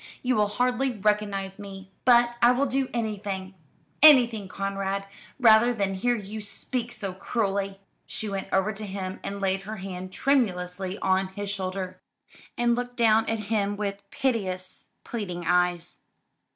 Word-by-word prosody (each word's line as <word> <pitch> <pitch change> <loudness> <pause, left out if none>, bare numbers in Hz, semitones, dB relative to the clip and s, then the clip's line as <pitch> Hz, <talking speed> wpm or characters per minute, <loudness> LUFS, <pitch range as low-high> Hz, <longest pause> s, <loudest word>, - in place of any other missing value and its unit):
You 255 0 +2
will 210 -1 +3
hardly 250 +4 0
recognise 205 -2 0
me. 195 -1 -9
But 240 -1 +5
I 240 +1 +7
will 270 +3 +1
do 265 0 0
anything 205 -4 -3 0.5
anything, 240 -9 +7
Conrad, 195 0 -3 0.3
rather 235 0 +6
than 200 -3 0
hear 240 +6 +1
you 215 0 -6
speak 235 +4 -2
so 200 -5 -3
cruelly." 195 -1 -2 0.3
She 220 - -3
went 195 -1 -3
over 190 +3 +2
to 210 +1 -6
him 190 -1 -5
and 200 0 -4
laid 195 0 0
her 215 +3 -6
hand 185 -1 -6
tremulously 190 -8 0
on 190 0 +2
his 200 +1 -5
shoulder, 185 -1 -4 0.6
and 240 0 +3
looked 245 +1 -3
down 225 -1 +4
at 225 -1 -1
him 205 -1 0
with 200 -1 -4
piteous, 190 -8 -2 0.2
pleading 180 -7 -5
eyes. 175 0 +1
200 Hz, 150 wpm, -26 LUFS, 190-230 Hz, 0.6 s, I